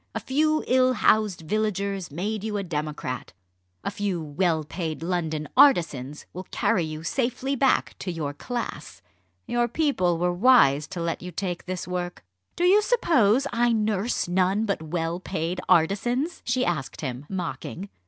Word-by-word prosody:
A - - 0
few 310 +3 +1
ill 255 0 +4
housed 215 -7 +2
villagers 200 +1 -1
made 200 +7 -3
you 215 -1 -2
a 200 - -2
democrat. 150 -6 -4 0.5
A - - -2
few 200 -4 -2
well 160 +1 0
paid 160 0 -5
London 160 -4 -2
artisans 150 - +3
will 185 +1 -7
carry 180 - +1
you 155 0 -5
safely 255 - -1
back 270 0 +2
to 185 - -3
your 155 -4 -3
class. 240 - -6 0.4
Your 240 0 +1
people 230 - +1
were 175 +1 +1
wise 175 - +5
to 185 -3 -5
let 165 -1 -2
you 180 - -7
take 180 0 -4
this 185 -1 -4
work." 180 -4 -4 0.3
"Do 345 - -1
you 385 +4 +6
suppose 280 - +3
I 240 0 +3
nurse 215 -1 0
none 190 +4 +2
but 200 -6 -1
well 165 +2 -2
paid 180 -1 -3
artisans?" 240 - +2
she 250 +1 +1
asked 155 -6 -3
him, 130 0 -5
mocking. 180 +1 -5
185 Hz, 155 wpm, -25 LUFS, 165-235 Hz, 0.5 s, you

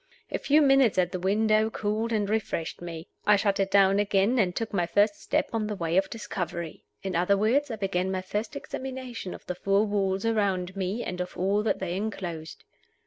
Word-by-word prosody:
A - - -1
few 300 +2 +4
minutes 270 -6 +4
at 180 -1 +2
the 185 - -3
window 215 +3 +2
cooled 220 +2 -2
and 210 -2 +1
refreshed 205 -7 -2
me. 165 -2 -7 0.2
I 210 - +7
shut 200 -1 +1
it 195 0 +1
down 195 0 +5
again, 205 +4 +2
and 180 -4 +1
took 225 -1 -3
my 175 -3 +1
first 205 +3 +2
step - - 0
on 220 -2 0
the 210 - -3
way 170 -2 -2
of 190 +1 +3
discovery. 170 -7 -5 0.2
In 190 -2 -3
other 180 +4 +3
words, 255 +8 +2
I 225 - -3
began 190 -3 -1
my 185 -1 -2
first 210 +7 -3
examination 260 -7 -6
of - - -14
the 180 - -3
four 195 +3 +2
walls 195 -1 0
around 195 -5 0
me, 195 +4 -2
and 180 0 -4
of 180 - -6
all 195 +3 +2
that 215 - 0
they 180 -2 -3
inclosed. 180 -6 -5
200 Hz, 205 wpm, -27 LUFS, 185-220 Hz, 0.2 s, I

